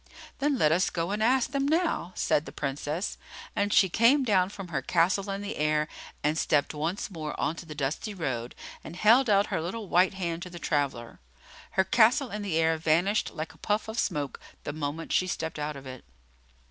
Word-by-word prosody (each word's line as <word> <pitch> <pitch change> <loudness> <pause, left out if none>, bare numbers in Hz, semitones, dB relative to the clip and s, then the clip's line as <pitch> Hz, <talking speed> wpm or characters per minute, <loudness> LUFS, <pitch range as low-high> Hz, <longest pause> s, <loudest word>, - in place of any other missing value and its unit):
"Then 285 0 +1
let 155 -8 +4
us 180 +4 +3
go 170 +2 -2
and 210 +1 -2
ask 250 +2 +3
them 275 0 0
now," 320 - +1
said 150 - +1
the - - -7
Princess; 145 +5 -3 0.4
and 205 0 +1
she 195 - +6
came 235 - +4
down 190 -6 +3
from 195 -3 -8
her 150 -5 -1
castle 185 +7 +1
in 195 0 -3
the 205 +1 -5
air, 150 0 +1 0.4
and 150 +2 +1
stepped 145 0 +1
once 160 +7 -3
more 155 -4 -5
on 160 - 0
to 170 - -9
the 150 - -7
dusty 150 - -3
road, 125 -8 -3 0.3
and 165 - -9
held 230 +6 +5
out 200 0 +5
her 165 - 0
little 200 +6 -5
white 185 +2 +3
hand 170 -3 -3
to 180 - -6
the 175 - -9
traveller. 140 -8 -2 0.5
Her 190 - +4
castle 235 +6 +4
in 210 +1 -4
the 190 -6 -1
air 165 0 +3
vanished 170 +7 +2
like 155 0 -5
a - - -22
puff 210 +1 -1
of 220 +1 -3
smoke 145 -7 -2 0.2
the 145 - -4
moment 155 +2 -4
she 185 - +2
stepped 160 -3 -3
out 150 0 -3
of 135 -1 -10
it. 130 -1 -9
175 Hz, 210 wpm, -28 LUFS, 150-205 Hz, 0.5 s, she